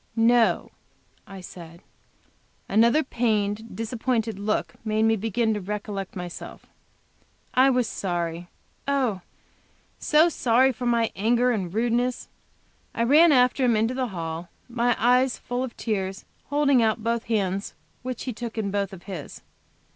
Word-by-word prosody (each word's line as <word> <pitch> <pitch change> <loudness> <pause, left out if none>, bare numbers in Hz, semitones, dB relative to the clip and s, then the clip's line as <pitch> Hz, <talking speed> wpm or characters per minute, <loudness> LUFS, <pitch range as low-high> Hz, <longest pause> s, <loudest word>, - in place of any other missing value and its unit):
"No," 230 0 +3 0.6
I 195 -1 -9
said. 170 -1 -11 0.8
Another 235 +9 +4
pained, 220 -3 -1
disappointed 225 -1 -2
look 210 +1 -1
made 215 0 0
me 225 0 +4
begin 220 +2 0
to 210 - -3
recollect 200 0 -5
myself. 180 -1 -8 0.9
I 260 +2 +5
was 250 -3 +2
sorry, 175 -2 -3 0.4
oh! 255 -9 0 0.8
so 305 +2 +4
sorry, 260 -4 +3
for 245 0 -4
my 235 -1 +2
anger 240 +4 +2
and 190 -7 -2
rudeness. 240 +4 0 0.7
I 230 - +1
ran 305 +7 +6
after 250 0 +3
him, 240 -3 +3
into 225 +3 +1
the 255 -1 -1
hall, 170 -3 -5 0.2
my 240 0 +1
eyes 250 +2 +3
full 245 +1 -3
of 255 -3 -7
tears, 195 -3 -3 0.2
holding 285 -3 +3
out 220 -1 +1
both 230 0 -1
hands, 200 -3 -1 0.3
which 255 0 -5
he 255 - -4
took 230 0 -7
in 205 -3 -1
both 195 -2 -3
his. 195 -2 -8
225 Hz, 140 wpm, -25 LUFS, 200-245 Hz, 0.9 s, ran